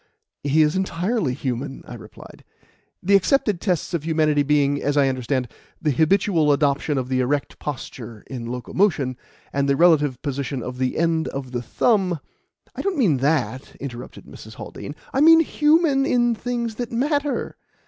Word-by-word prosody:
"He 145 +2 +3
is 150 +2 +1
entirely 190 - -1
human," 135 +1 -4
I - - -9
replied; - - -13 0.6
"the 200 +2 +4
accepted 205 -2 +2
tests 180 -4 -1
of 170 - 0
humanity 155 -2 +2
being, 145 0 +2
as 145 +1 0
I 140 -1 +4
understand, 130 0 -1 0.3
the 150 - 0
habitual 160 +1 +2
adoption 145 0 +1
of 130 -1 -2
the 130 0 0
erect 140 +3 -1
posture 120 -6 -7
in 120 -3 -6
locomotion, 130 - 0 0.4
and 140 0 0
the 140 - +3
relative 150 -6 +3
position 140 -3 -3
of 125 0 -6
the 130 -1 -1
end 165 -1 +1
of 135 -2 -6
the 120 -1 -2
thumb 185 - +1 0.3
" - - -37
"I - - -4
don't 390 -3 -1
mean 190 - +3
that," 135 -1 -1
interrupted 125 -3 -8
Mrs. - - -12
Haldean. 145 - -8 0.2
"I 270 - +2
mean 325 +1 +8
human 300 -3 +2
in 240 -1 +2
things 235 0 -3
that 240 -2 -4
matter." 285 +4 -1
150 Hz, 165 wpm, -22 LUFS, 135-200 Hz, 0.6 s, mean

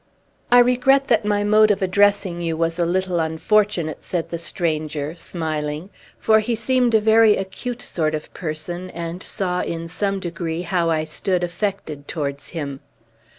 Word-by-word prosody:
"I 245 - +8
regret 255 +3 +4
that 220 -3 +3
my 205 0 +1
mode 215 +1 +5
of 200 -2 +1
addressing 190 -2 +2
you 165 -1 -2
was 165 +1 -1
a 170 - +2
little 185 0 0
unfortunate," 165 0 +1
said 175 -3 -3
the 170 - -3
stranger, 155 -2 -2
smiling; 155 0 -4 0.3
for 220 0 +4
he 230 +2 -1
seemed 245 +1 +2
a - - +6
very 220 0 +5
acute 235 +6 -5
sort 155 -2 -1
of 155 - -7
person, 175 +3 -5
and 170 +1 -6
saw, 180 -3 -1
in 165 0 -4
some 195 +3 -1
degree, 170 -1 -4
how 170 -1 0
I 160 -1 +1
stood 175 +4 -1
affected 175 -5 -3
towards 140 -3 -4
him. 140 -5 -5
175 Hz, 160 wpm, -22 LUFS, 160-205 Hz, 0.3 s, I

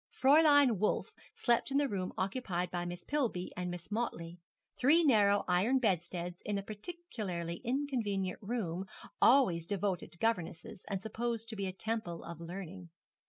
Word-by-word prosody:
Fräulein 285 - +6
Wolf 210 - 0 0.2
slept 240 +1 +2
in 275 - +1
the 285 0 +3
room 190 -6 -3
occupied 185 -3 -2
by 175 -1 -2
Miss 175 0 -6
Pillby 245 -11 -1
and 180 0 -3
Miss 175 +2 -7
Motley 175 -7 -3 0.4
three 305 +7 +4
narrow 205 -8 +4
iron 190 +9 +3
bedsteads 180 -5 -1
in 205 -1 -1
a 200 - -3
particularly 210 - -5
inconvenient 230 -8 -1
room, 195 -5 -3 0.3
always 185 -11 +5
devoted 195 -1 -2
to - - -8
governesses, 180 -4 -2
and 195 -2 -3
supposed 230 0 -3
to 225 - -5
be 200 -2 -2
a - - -2
temple 195 -3 -4
of 170 -1 -8
learning. 180 +1 -7
200 Hz, 155 wpm, -33 LUFS, 180-240 Hz, 0.4 s, Fräulein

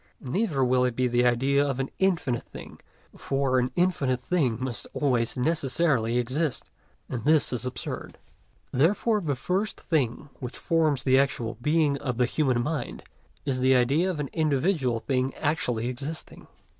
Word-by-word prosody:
Neither 140 - 0
will 125 0 +3
it 125 -2 0
be 125 +1 +1
the 120 0 +3
idea 135 +4 +2
of 135 -2 -2
an 135 - -2
infinite 165 -11 0
thing, - - -11 0.4
for 135 -1 0
an 125 0 0
infinite 150 -8 +1
thing 130 -5 0
must 130 -2 -4
always 125 -5 +1
necessarily 135 -4 +1
exist, 130 +4 -1 0.4
and 120 -3 -4
this 150 -2 +3
is 125 +1 -2
absurd. 125 - -5 0.5
Therefore 205 - +2
the 145 -6 -1
first 190 - -2
thing 140 -3 -1
which 125 -2 -6
forms 155 -6 +1
the 130 0 +4
actual 120 -5 -1
Being 150 0 +2
of 125 -4 -3
the 125 - +3
human 125 -2 +1
mind 150 -2 -4 0.4
is 135 -3 -1
the 130 +1 +4
idea 140 +9 +3
of 175 -5 -3
an 140 -2 -3
individual 145 - +1
thing 130 +1 -1
actually 125 -7 -1
existing. 140 +6 -6
135 Hz, 155 wpm, -26 LUFS, 125-155 Hz, 0.5 s, the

